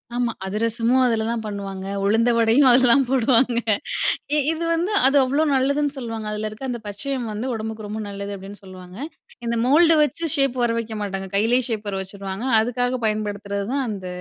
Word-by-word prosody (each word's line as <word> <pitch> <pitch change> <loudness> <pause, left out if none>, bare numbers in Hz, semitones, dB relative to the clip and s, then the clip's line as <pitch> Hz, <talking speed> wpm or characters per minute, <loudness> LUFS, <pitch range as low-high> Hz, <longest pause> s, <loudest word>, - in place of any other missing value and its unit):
ஆமா, 240 -1 0
அதிரசமும் 230 +5 +1
அதுலதான் 225 -1 0
பண்ணுவாங்க, 195 -2 -5 0.2
உளுந்த 225 +4 +3
வடையும் 230 +5 +4
அதுலதான் 255 +2 +5
போடுவாங்க 245 -1 +3 0.8
இ - - +3
இது 325 +1 -3
வந்து, 350 +5 0 0.2
அது 280 +1 +3
அவ்ளோ 280 +5 +1
நல்லதுன்னு 280 +2 +1
சொல்லுவாங்க, 225 -3 -5
அதுல 215 0 -3
இருக்க 215 +5 -11
அந்த 240 -1 -3
பச்சையம் 240 +3 -4
வந்து 215 +4 -4
உடம்புக்கு 220 -1 -5
ரொம்ப 215 +1 -5
நல்லது 200 0 -6
அப்பிடின்னு 195 +2 -11
சொல்லுவாங்க. 185 0 -12 0.5
இந்த 235 0 -1
மோல்டு 325 +4 +5
வச்சி 330 +3 -2
ஷேப் 275 -2 +2
வரவைக்க 230 -1 -1
மாட்டாங்க, 195 -1 -4
கையிலே 235 +5 +3
ஷேப் 215 -2 -3
வரவச்சுருவாங்க. 195 +3 -5
அதுக்காக 245 +2 0
பயன்படுத்துறதுதான் 210 +4 -2
அந்த 190 -3 -5
225 Hz, 155 wpm, -22 LUFS, 205-255 Hz, 0.8 s, அதுலதான்